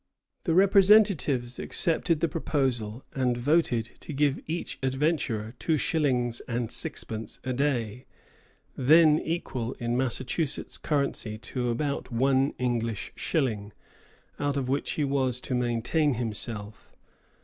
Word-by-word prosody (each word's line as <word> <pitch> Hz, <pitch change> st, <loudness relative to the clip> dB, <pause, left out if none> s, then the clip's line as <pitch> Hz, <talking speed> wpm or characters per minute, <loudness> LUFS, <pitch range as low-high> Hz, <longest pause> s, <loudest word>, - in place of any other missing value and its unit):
The 165 Hz, -, +1 dB
representatives 190 Hz, -, +4 dB
accepted 165 Hz, -2 st, +1 dB
the 170 Hz, -, +3 dB
proposal 130 Hz, -8 st, -2 dB
and 125 Hz, -2 st, 0 dB
voted 125 Hz, -3 st, +2 dB
to 155 Hz, -, -8 dB
give 145 Hz, 0 st, +1 dB
each 165 Hz, +3 st, -4 dB
adventurer 130 Hz, -5 st, -1 dB
two 160 Hz, -2 st, +1 dB
shillings 125 Hz, -7 st, +1 dB
and 120 Hz, -1 st, -2 dB
sixpence 110 Hz, 0 st, -2 dB
a 130 Hz, -, -2 dB
day, 125 Hz, -3 st, -1 dB, 0.7 s
then 155 Hz, +3 st, +6 dB
equal 130 Hz, -7 st, -3 dB
in 120 Hz, -1 st, -2 dB
Massachusetts 130 Hz, +4 st, -2 dB
currency 140 Hz, -7 st, -1 dB
to 125 Hz, +3 st, -3 dB
about 140 Hz, +3 st, -2 dB
one 135 Hz, +3 st, +2 dB
English 115 Hz, -4 st, -2 dB
shilling, 110 Hz, -9 st, -1 dB, 0.7 s
out 145 Hz, -1 st, 0 dB
of 130 Hz, -2 st, -1 dB
which 140 Hz, +2 st, -1 dB
he 150 Hz, -, -1 dB
was 135 Hz, -3 st, 0 dB
to -, -, -3 dB
maintain 125 Hz, +4 st, +1 dB
himself. 110 Hz, -2 st, -4 dB
130 Hz, 120 wpm, -27 LUFS, 120-150 Hz, 0.7 s, then